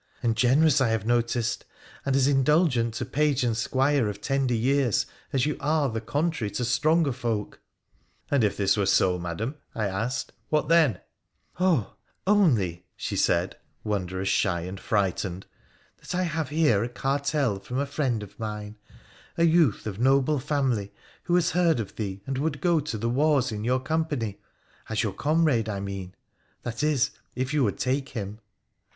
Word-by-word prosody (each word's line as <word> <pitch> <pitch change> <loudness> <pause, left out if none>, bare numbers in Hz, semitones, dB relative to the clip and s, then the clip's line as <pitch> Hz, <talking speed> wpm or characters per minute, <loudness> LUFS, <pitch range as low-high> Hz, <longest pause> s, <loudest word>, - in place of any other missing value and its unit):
' - - -31
And 115 -2 +2
generous, 135 +5 +4
I 130 - +4
have 110 -2 -1
noticed, 120 0 0 0.4
and 135 - +2
as 135 -1 +4
indulgent 135 -4 +3
to - - -3
page 145 -2 +1
and 120 -2 +1
squire 135 0 +1
of 100 -1 -6
tender 135 -1 0
years 130 0 +2 0.3
as 130 -2 +1
you 150 - -1
are 150 -1 +1
the 110 -1 -3
contrary 145 -2 -1
to 125 - 0
stronger 155 +4 +2
folk.' 115 -4 -3 0.3
' - - -38
And 140 -5 +3
if 105 - +1
this 100 -1 +3
Were 100 -2 0
so, 90 -2 +3
Madam,' 90 - -4 0.2
I 110 - -1
asked, 110 +6 -2
' - - -43
what 150 0 +1
then? 155 - +4 0.2
' - - -50
' - - -29
Oh! 170 - +2 0.3
only,' 115 - +2
she - - -4
said, - - +1 0.3
wondrous 95 -2 -2
shy 95 -2 +1
and 90 +3 -6
frightened, 95 -2 -1 0.5
'that - - -6
I 185 - +1
have 160 -4 -2
here 145 -9 +3
a 120 - -3
cartel 135 -3 0
from 125 +6 -5
a 140 - +1
friend 130 -6 -1
of 100 - -13
mine, 105 -1 -5 0.6
a 170 - +3
youth 165 - +3
of 105 -2 -5
noble 135 +3 +3
family, 130 -8 -1 0.3
who 175 - +2
has 175 -2 +2
heard 170 -5 +3
of 105 - -5
thee, 100 -2 -5
and 135 -1 -3
would 145 -1 -1
go 170 -2 +3
to 145 -6 -4
the 115 +2 -2
wars 135 0 +2
in 105 -1 -4
your 125 +3 +1
company 145 -7 -2 0.2
— - - -26
as 110 +1 0
your 105 -4 -2
comrade, 145 - +1
I 100 -2 -3
mean: 100 -1 -6 0.5
that 120 +2 -4
is, 150 -4 +2 0.2
if 130 +3 -2
you 150 -3 +3
would 100 -5 0
take 135 +2 -1
him.' 105 -3 -6
125 Hz, 185 wpm, -26 LUFS, 105-145 Hz, 0.6 s, generous